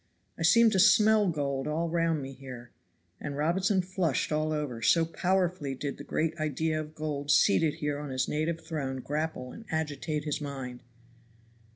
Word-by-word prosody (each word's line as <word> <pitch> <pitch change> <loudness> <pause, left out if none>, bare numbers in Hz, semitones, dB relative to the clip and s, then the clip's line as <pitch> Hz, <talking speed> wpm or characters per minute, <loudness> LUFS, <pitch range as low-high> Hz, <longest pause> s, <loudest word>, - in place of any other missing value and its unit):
I - - -11
seem 220 +8 +6
to 195 - +2
smell 215 +1 +6
gold 140 -5 -1
all 160 +3 -1
round 165 -3 0
me 135 0 -7
here." 125 -3 -10 0.5
And 140 -1 -5
Robinson 185 +5 +1
flushed 180 -6 -1
all 155 0 0
over, 145 -7 -3
so 165 +8 +4
powerfully 175 -4 0
did 140 +2 -4
the - - -6
great 160 +2 -1
idea 155 +1 0
of 155 0 -10
gold 145 -2 -4
seated 160 0 +4
here 145 -1 -2
on 145 -1 -6
his 130 -1 -1
native 160 +2 -1
throne 140 -5 -4
grapple 150 -3 -3
and 225 - -10
agitate 150 -1 -2
his 150 0 -2
mind. 130 -4 -6
155 Hz, 170 wpm, -29 LUFS, 140-165 Hz, 0.5 s, seem